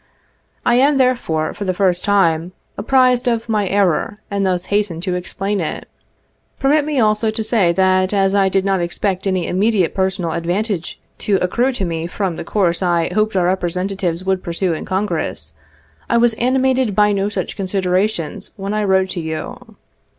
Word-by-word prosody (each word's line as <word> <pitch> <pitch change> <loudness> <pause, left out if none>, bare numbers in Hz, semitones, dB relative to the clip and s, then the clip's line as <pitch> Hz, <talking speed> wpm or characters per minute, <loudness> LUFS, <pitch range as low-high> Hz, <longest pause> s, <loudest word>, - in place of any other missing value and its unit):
I 240 - +4
am. 280 +1 +4
therefore, 240 -12 +1
for 205 - -6
the 185 -2 -1
first 180 -2 +1
time, 180 -4 +2 0.2
apprised 250 +2 +2
of 230 -1 0
my 210 -3 0
error 200 +2 +1
and 200 -1 0
thus 185 -1 0
hasten 205 -5 0
to 185 0 -2
explain 195 +3 -3
it. 155 - -4 0.7
Permit 290 +2 +3
me 300 -3 -1
also 215 0 +2
to 220 +1 -2
say 215 -6 +2
that 185 0 +2
as 195 -1 +2
I 195 -1 +3
did 195 0 0
not 195 -1 +1
expect 185 +2 -2
any 185 -3 0
immediate 195 -1 +1
personal 190 -3 -1
advantage 175 +2 -2 0.2
to 205 - +1
accrue 235 +8 +1
to 200 -6 -2
me 165 -1 -3
from 185 -1 -2
the - - -6
course 175 -1 0
I 170 -2 +1
hoped 215 -1 +1
our 180 -2 +2
representatives 180 0 -1
would 190 -1 0
pursue 170 +1 -1
in 155 - -5
Congress, 190 +2 -2 0.6
I 235 - +3
was 235 0 +4
animated 255 -1 +1
by 210 0 +4
no 200 0 0
such - - -4
considerations 190 -3 -1
when 200 +1 -4
I 215 0 0
wrote 190 -1 +2
to 180 - -3
you. 160 -1 -6
195 Hz, 175 wpm, -18 LUFS, 180-215 Hz, 0.7 s, I